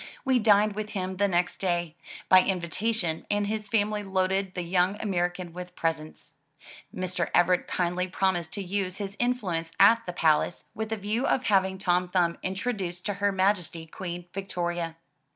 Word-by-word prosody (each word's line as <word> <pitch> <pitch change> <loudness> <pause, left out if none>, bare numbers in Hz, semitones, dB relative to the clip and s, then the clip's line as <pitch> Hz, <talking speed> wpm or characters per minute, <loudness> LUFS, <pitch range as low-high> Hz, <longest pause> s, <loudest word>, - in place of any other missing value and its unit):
We 260 -1 +3
dined 210 -1 +4
with 215 +1 -5
him 185 -1 -3
the 200 +1 +3
next 175 -1 0
day, 175 -3 -1 0.3
by 185 - +8
in 185 0 +1
vitation, 175 -1 -2
and 205 0 +1
his 215 +1 -3
family 210 -1 +1
loaded 190 -1 0
the 180 - -2
young 180 +3 +1
American 175 -3 -2
with 180 0 -8
presents. 160 -1 -3 0.6
Mr. 180 -1 -2
Everett 175 +1 +3
kindly 180 +1 0
promised 180 -3 0
to 200 - -3
use 190 0 -2
his 200 -1 -5
influence 190 -10 -1
at 230 0 +7
the 180 - -3
palace 160 0 +1
with 220 0 -4
a 220 - 0
view 210 +5 -1
of 260 - +1
having 190 -3 +2
Tom 180 -1 +1
Thumb 175 -2 +1
introduced 190 -2 -3
to 205 - 0
Her 205 0 +3
Majesty 185 -4 0
Queen 175 +1 -6
Victoria. 175 -3 -3
185 Hz, 170 wpm, -27 LUFS, 175-205 Hz, 0.6 s, by